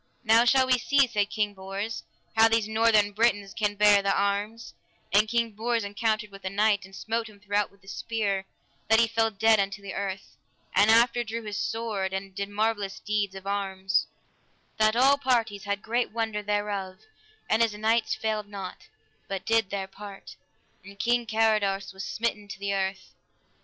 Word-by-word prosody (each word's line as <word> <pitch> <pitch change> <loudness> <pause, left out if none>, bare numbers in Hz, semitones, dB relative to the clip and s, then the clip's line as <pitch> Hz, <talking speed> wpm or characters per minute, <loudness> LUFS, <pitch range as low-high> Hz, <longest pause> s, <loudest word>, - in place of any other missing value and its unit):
Now 230 +1 +5
shall 260 +1 +5
we 255 -1 +3
see, 280 +3 +4
said 205 -4 -1
King 210 -1 -1
Bors, 195 +3 -5 0.3
how 225 0 +7
these 225 -1 +1
northern 220 -2 +3
Britons 205 -2 +1
can 210 -1 -1
bear 205 -1 +5
the 200 0 +1
arms: 205 +3 -1 0.4
and 210 +2 +5
King 235 0 0
Bors 230 +2 -1
encountered 210 +1 -1
with 195 0 -13
a 190 - -2
knight, 205 0 +2
and 190 0 -14
smote 225 +2 -3
him 205 -1 -17
throughout 205 0 0
with 200 -1 -26
a - - -21
spear 200 -2 -2 0.4
that 220 0 +6
he 230 - +4
fell 225 0 +1
dead 220 +1 +3
unto 200 +1 -1
the 200 -1 -7
earth; 195 -1 -5 0.4
and 205 +3 +5
after 235 +2 +4
drew 230 0 -5
his 210 -1 -4
sword 210 -4 -2
and 190 0 -5
did 200 +1 -4
marvellous 205 -1 -1
deeds 205 -2 -1
of 190 0 -9
arms, 195 -1 -1 0.7
that 215 0 +4
all 270 +3 +5
parties 230 -7 0
had 200 0 -2
great 235 +2 0
wonder 220 -2 -2
thereof; 205 -2 -3 0.5
and 220 - +2
his 225 -2 +2
knights 220 +2 +1
failed 215 -2 -2
not, 195 -3 -8 0.4
but 195 -1 -5
did 225 -3 +2
their 195 -1 -3
part, 200 +1 -11 0.5
and 200 +1 -13
King 240 +2 +1
Carados 210 -3 +1
was 190 0 -7
smitten 210 +1 -3
to 200 - -8
the 200 0 -2
earth. 190 0 -3
210 Hz, 180 wpm, -27 LUFS, 200-225 Hz, 0.7 s, how